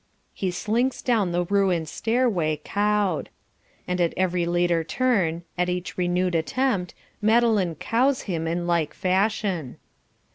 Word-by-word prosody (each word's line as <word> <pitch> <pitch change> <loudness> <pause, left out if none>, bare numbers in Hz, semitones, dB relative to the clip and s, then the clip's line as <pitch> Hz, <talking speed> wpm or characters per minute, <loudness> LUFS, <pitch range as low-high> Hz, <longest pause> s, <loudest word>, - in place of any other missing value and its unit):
He 190 - -2
slinks 230 +8 -1
down 220 -8 +1
the 175 +1 +1
ruined 185 -4 +1
stairway 205 - 0
"cowed." 205 -4 0 0.6
And 180 0 -1
at 170 - +1
every 180 -2 +1
later 175 -1 +1
turn, 180 -6 0 0.2
at 180 0 +2
each 180 0 -3
renewed 180 0 0
attempt, 180 +2 0 0.3
Madeline 215 -5 +3
"cows" 255 - +1
him 165 -4 -3
in 170 +1 -1
like 170 -3 0
fashion. 190 - 0
180 Hz, 130 wpm, -24 LUFS, 170-215 Hz, 0.6 s, Madeline